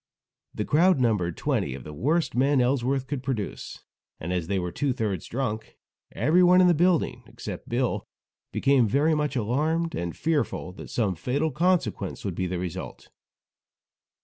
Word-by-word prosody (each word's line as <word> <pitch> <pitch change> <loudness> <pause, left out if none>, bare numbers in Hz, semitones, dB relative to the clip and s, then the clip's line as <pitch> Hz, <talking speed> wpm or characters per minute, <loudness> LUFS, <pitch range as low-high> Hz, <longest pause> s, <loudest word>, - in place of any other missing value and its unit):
The - - -2
crowd 175 +2 +4
numbered 105 -9 +1
twenty 65 - -1
of 65 - -9
the 75 - -8
worst 155 - 0
men 135 +3 +3
Ellsworth 130 +1 +1
could 140 -1 -4
produce, 125 -6 -4 0.4
and 85 +3 -3
as 90 -3 -2
they 100 - 0
were 90 -1 -2
two 140 +3 0
thirds 105 -8 -2
drunk, 115 -4 -4 0.4
everyone 180 - +5
in 185 - +6
the 175 - +5
building 175 +1 +2
except - - -8
Bill 120 +1 -1 0.4
became 135 -4 +3
very 145 +9 +2
much 150 -2 -1
alarmed, 155 +8 0
and 85 -6 -4
fearful 150 - -1
that 90 - -10
some 105 -6 0
fatal 140 - -1
consequences 150 - 0
would 95 - -2
be 90 +2 -2
the 90 0 -3
result. 90 0 -6
130 Hz, 160 wpm, -26 LUFS, 95-150 Hz, 0.4 s, in